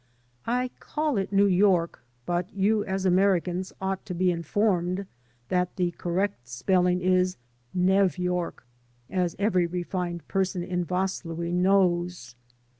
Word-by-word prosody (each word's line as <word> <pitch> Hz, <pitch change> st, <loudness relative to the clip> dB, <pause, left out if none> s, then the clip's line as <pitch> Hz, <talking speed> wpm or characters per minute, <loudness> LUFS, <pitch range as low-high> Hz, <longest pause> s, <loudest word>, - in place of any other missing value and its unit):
I 250 Hz, +2 st, 0 dB
call 300 Hz, -5 st, -1 dB
it 195 Hz, -, -3 dB
New 200 Hz, 0 st, +4 dB
York, 185 Hz, -3 st, +2 dB, 0.2 s
but 175 Hz, +1 st, -1 dB
you 205 Hz, +2 st, +2 dB
as 190 Hz, 0 st, -2 dB
Americans 185 Hz, -1 st, +2 dB
ought 190 Hz, 0 st, -2 dB
to 180 Hz, -, -4 dB
be 180 Hz, +1 st, +2 dB
informed 180 Hz, +2 st, 0 dB, 0.4 s
that 180 Hz, -1 st, 0 dB
the 180 Hz, -2 st, 0 dB
correct 175 Hz, -6 st, -2 dB
spelling 180 Hz, +9 st, +1 dB
is 185 Hz, 0 st, +2 dB, 0.3 s
Nev 190 Hz, +1 st, +3 dB
York, 180 Hz, -6 st, -2 dB, 0.5 s
as 180 Hz, -3 st, 0 dB
every 185 Hz, -4 st, +2 dB
refined 175 Hz, -1 st, -4 dB
person 185 Hz, -2 st, -1 dB
in 180 Hz, 0 st, -1 dB
Vaslui 170 Hz, -2 st, -2 dB
knows. 180 Hz, -7 st, +2 dB
180 Hz, 125 wpm, -26 LUFS, 175-195 Hz, 0.5 s, New